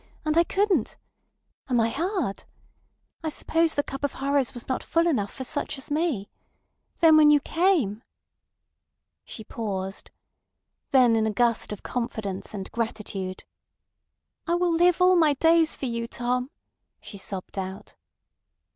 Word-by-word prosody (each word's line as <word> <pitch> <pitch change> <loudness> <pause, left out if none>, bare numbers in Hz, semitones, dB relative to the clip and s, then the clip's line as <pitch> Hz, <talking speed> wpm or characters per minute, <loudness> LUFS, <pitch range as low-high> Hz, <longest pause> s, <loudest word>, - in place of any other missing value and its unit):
And 310 0 +1
I 335 - +6
couldn't. 380 - 0 0.7
Am 245 -2 +2
I 225 0 +3
hard? 335 - -2 0.8
I 320 - -1
suppose 325 +1 0
the 285 - +1
cup 270 0 -7
of 285 - 0
horrors 275 -2 0
was 245 - -7
not 260 - -1
full 335 0 +1
enough 250 -12 0
for 260 - -6
such 285 +3 -3
as 270 - -8
me. 295 - 0 0.7
Then 320 -2 +7
when 305 -1 +7
you 295 0 +6
came.... 305 - +1 0.6
" - - -57
She 220 - -9
paused. 195 -4 -5 0.8
Then 250 -4 +5
in 220 -1 +2
a - - 0
gust 230 +1 +1
of 210 - -7
confidence 220 -5 -4
and 195 -1 -6
gratitude, 210 -5 -4 1.0
"I 340 - +2
will 350 -1 +1
live 355 +2 +4
all 365 0 +6
my 310 -4 +4
days 325 +1 +3
for - - -5
you, 235 -1 -3
Tom!" 250 +2 -2 0.5
she 200 - -10
sobbed 190 0 -6
out. 190 0 -7
260 Hz, 150 wpm, -26 LUFS, 220-325 Hz, 1.0 s, Then